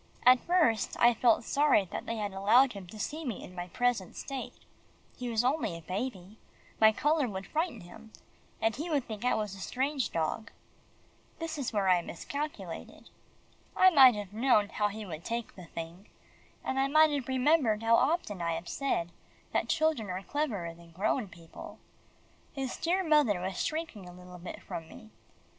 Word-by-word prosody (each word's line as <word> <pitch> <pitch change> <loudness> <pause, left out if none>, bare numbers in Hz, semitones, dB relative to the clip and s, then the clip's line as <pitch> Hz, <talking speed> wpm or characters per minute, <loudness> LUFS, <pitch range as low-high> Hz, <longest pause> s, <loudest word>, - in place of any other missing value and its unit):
At 250 0 +8
first, 320 -11 +2
I 240 0 +6
felt 230 0 +3
sorry 280 -6 +3
that - - -5
they 230 - -2
had 210 -2 -3
allowed 230 +7 +4
him 195 -3 -9
to 215 - -11
see 310 +9 -4
me 240 -9 -4
in 180 - -11
my 175 0 -5
present 245 -1 -1
state. 270 -2 -6 0.6
He 250 -1 -5
was 230 0 +1
only 255 - 0
a 165 - -12
baby. 195 +2 -5 0.4
My 220 0 +7
colour 295 +4 +1
would 190 -1 -5
frighten 315 - -2
him, 175 +6 -13 0.5
and 225 0 +1
he 315 +6 -4
would 285 -5 0
think 215 -1 -7
I 250 - +2
was 210 -3 -2
a 195 - -10
strange 265 - -1
dog. 165 +7 -2 0.9
That 330 -1 -4
is 280 -5 -3
where 205 -3 0
I 180 -1 +4
miscalculated. 285 - -6 0.7
I 370 0 +7
might 265 -7 +8
have 205 -2 -6
known 220 -3 +3
how 210 - 0
he 210 +1 -6
would 165 -3 -7
take 235 +3 -4
the 185 - -10
thing, 165 +4 -8 0.6
and 265 - -1
I 270 - +3
might 310 +2 +5
have 280 -3 -2
remembered 260 -4 +2
how 230 0 +5
often 260 - +1
I 170 0 0
have 165 +1 -5
said, 175 -12 -1 0.4
that - - 0
children 315 - +1
are 185 +1 -4
cleverer 210 - -2
than 170 0 -16
grown 210 +5 0
people. 170 -3 -12 0.8
His 270 -3 -3
dear 365 +3 0
mother 295 - +3
was 185 0 -3
shrinking 310 - -4
a - - -11
little 180 0 -12
bit 175 - -8
from 165 -1 -7
me. 220 +1 -13
225 Hz, 185 wpm, -30 LUFS, 190-275 Hz, 0.9 s, At